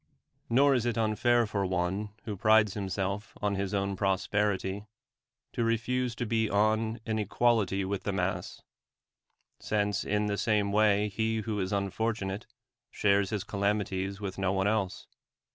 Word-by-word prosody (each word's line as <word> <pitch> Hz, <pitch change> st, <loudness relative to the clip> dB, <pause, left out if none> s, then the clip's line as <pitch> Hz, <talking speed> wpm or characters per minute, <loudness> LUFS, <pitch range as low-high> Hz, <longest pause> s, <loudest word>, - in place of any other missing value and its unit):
Nor 135 Hz, +4 st, +5 dB
is 120 Hz, -2 st, +1 dB
it 120 Hz, -, -1 dB
unfair 115 Hz, +2 st, +2 dB
fur 100 Hz, -2 st, -2 dB
one 95 Hz, +3 st, -1 dB
who 110 Hz, -3 st, -4 dB
prides 110 Hz, 0 st, +4 dB
himself 100 Hz, +1 st, -3 dB
on 105 Hz, -1 st, 0 dB
his 100 Hz, -1 st, -2 dB
own 100 Hz, -1 st, -1 dB
prosperity, 100 Hz, +1 st, 0 dB, 0.7 s
to 120 Hz, -, 0 dB
refuse 120 Hz, +2 st, 0 dB
to 120 Hz, -, -3 dB
be 110 Hz, -1 st, +1 dB
on 110 Hz, +2 st, +1 dB
an 110 Hz, -1 st, -1 dB
equality 105 Hz, -2 st, +1 dB
with 100 Hz, 0 st, -2 dB
the 100 Hz, -, -2 dB
mass; 90 Hz, -2 st, -3 dB, 1.0 s
since 105 Hz, -2 st, 0 dB
in 105 Hz, 0 st, 0 dB
the 100 Hz, -1 st, -1 dB
same 105 Hz, -3 st, +1 dB
way 105 Hz, 0 st, +3 dB
he 110 Hz, +2 st, -1 dB
who 110 Hz, -1 st, -3 dB
is 95 Hz, -1 st, -2 dB
unfortunate 100 Hz, +1 st, -2 dB, 0.4 s
shares 100 Hz, -1 st, +2 dB
his 105 Hz, -4 st, -2 dB
calamities 100 Hz, -1 st, -1 dB
with 100 Hz, -2 st, -5 dB
no 95 Hz, -1 st, +1 dB
one 95 Hz, 0 st, 0 dB
else. 105 Hz, -3 st, -1 dB
105 Hz, 150 wpm, -29 LUFS, 100-110 Hz, 1.0 s, Nor